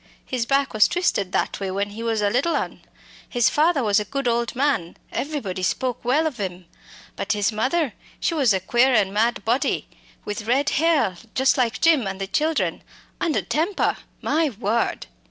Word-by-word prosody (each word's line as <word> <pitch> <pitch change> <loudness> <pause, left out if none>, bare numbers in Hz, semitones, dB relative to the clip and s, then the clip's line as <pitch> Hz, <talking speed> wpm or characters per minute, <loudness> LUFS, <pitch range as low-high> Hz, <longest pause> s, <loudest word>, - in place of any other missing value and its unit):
His 245 -3 -2
back 275 0 +1
was 215 -1 +5
twisted 205 - 0
that - - -1
way 195 -1 -3
when 200 +2 -2
he 220 +2 -7
was 225 -2 0
a 205 - +3
little 280 +9 +1
un. - - -3 0.5
His 240 -2 +2
father 305 -2 +3
was 210 -1 +3
a - - -1
good 275 +5 -3
old 235 +1 0
man 260 -11 0
everybody 230 -11 -3
spoke 250 +7 -1
well 275 +7 +2
of 285 -7 -3
'im 185 -2 -4 0.5
but 215 - -1
his 205 +1 +1
mother, 260 +5 0 0.3
she - - 0
was 275 -8 +3
a 190 - +2
queer 240 +2 +3
mad 210 +2 0
body, 240 +4 0 0.4
with 210 +1 -5
red 270 +4 +2
hair, 305 - +2 0.2
just 265 0 +3
like 250 -2 0
Jim 310 -10 +4
and 190 0 -4
the 195 - -2
children, 310 +10 0 0.4
and 330 -4 0
a - - +1
temper! 335 +7 0 0.3
my 315 +1 +2
word. 225 0 -1
240 Hz, 185 wpm, -23 LUFS, 205-285 Hz, 0.5 s, was